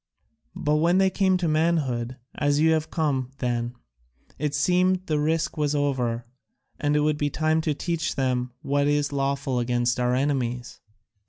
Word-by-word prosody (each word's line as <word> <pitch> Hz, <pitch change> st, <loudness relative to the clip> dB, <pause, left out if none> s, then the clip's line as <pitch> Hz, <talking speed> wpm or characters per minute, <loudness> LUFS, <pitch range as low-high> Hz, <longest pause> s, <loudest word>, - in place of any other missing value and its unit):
But 150 Hz, +1 st, +1 dB
when 170 Hz, +4 st, +3 dB
they 190 Hz, 0 st, +4 dB
came 190 Hz, -2 st, +2 dB
to 180 Hz, -2 st, -1 dB
manhood, 150 Hz, -7 st, 0 dB, 0.2 s
as 145 Hz, 0 st, +1 dB
you 160 Hz, +1 st, +4 dB
have 160 Hz, -1 st, 0 dB
come, 140 Hz, -6 st, -1 dB
then, 120 Hz, -1 st, -2 dB, 0.6 s
it 150 Hz, -1 st, -1 dB
seemed, 180 Hz, +5 st, +2 dB
the 155 Hz, -3 st, 0 dB
risk 160 Hz, +2 st, 0 dB
was 150 Hz, -1 st, 0 dB
over, 125 Hz, -5 st, 0 dB, 0.5 s
and 145 Hz, 0 st, +1 dB
it 150 Hz, -, +3 dB
would 150 Hz, 0 st, +1 dB
be 145 Hz, -, +1 dB
time 155 Hz, +2 st, +1 dB
to 155 Hz, -2 st, -1 dB
teach 170 Hz, +1 st, -2 dB
them 125 Hz, -2 st, 0 dB
what 140 Hz, +1 st, +1 dB
is 145 Hz, 0 st, +1 dB
lawful 135 Hz, -2 st, -1 dB
against 120 Hz, 0 st, 0 dB
our 125 Hz, 0 st, +2 dB
enemies. 125 Hz, -3 st, -1 dB
145 Hz, 165 wpm, -25 LUFS, 125-160 Hz, 0.6 s, they